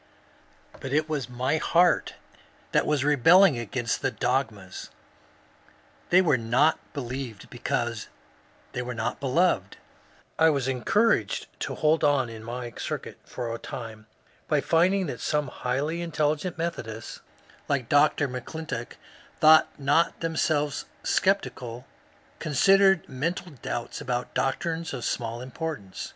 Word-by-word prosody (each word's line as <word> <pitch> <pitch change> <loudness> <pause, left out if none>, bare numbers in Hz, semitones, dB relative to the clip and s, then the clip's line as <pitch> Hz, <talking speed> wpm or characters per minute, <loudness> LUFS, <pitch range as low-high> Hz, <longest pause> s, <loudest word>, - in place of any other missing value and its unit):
But 135 - -5
it 155 +1 +2
was 145 -6 -3
my 125 +5 0
heart 170 +2 +3 0.6
that - - +2
was 150 -3 +1
rebelling 150 +2 +6
against 120 0 -2
the - - +1
dogmas. 110 -8 -2 1.2
They 185 +2 +6
were 150 -8 +3
not 125 +8 +3
believed 125 -5 -6
because - - -2 0.6
they - - -3
were 125 0 -5
not 110 0 -2
beloved. 160 +7 +1 0.6
I 160 0 +6
was 140 -4 0
encouraged 205 - +1
to - - -3
hold 155 +1 +2
on 140 -4 +3
in 110 -1 -9
my 120 +1 -6
circuit - - -5
for 120 -2 -5
a 115 - -5
time 115 -5 -8 0.4
by 150 - +2
finding 180 +6 +2
that 130 -7 -5
some 150 -3 0
highly 140 +8 -2
intellectual 155 +1 -1
Methodists 115 -10 -5 0.5
like 130 -4 0
Dr. 145 +1 +3
M'Clintock, 125 0 -6 0.4
though 155 0 +9 0.2
not 145 +4 +2
themselves 155 -3 0 0.2
sceptical, 125 -11 0 0.5
considered 195 +5 +4
mental 165 +7 -3
doubts 120 -3 -5
about 125 -1 -3
doctrines 160 +3 -1
of 125 - -5
small 115 0 -2
importance. 130 - -6
140 Hz, 125 wpm, -26 LUFS, 125-160 Hz, 1.2 s, though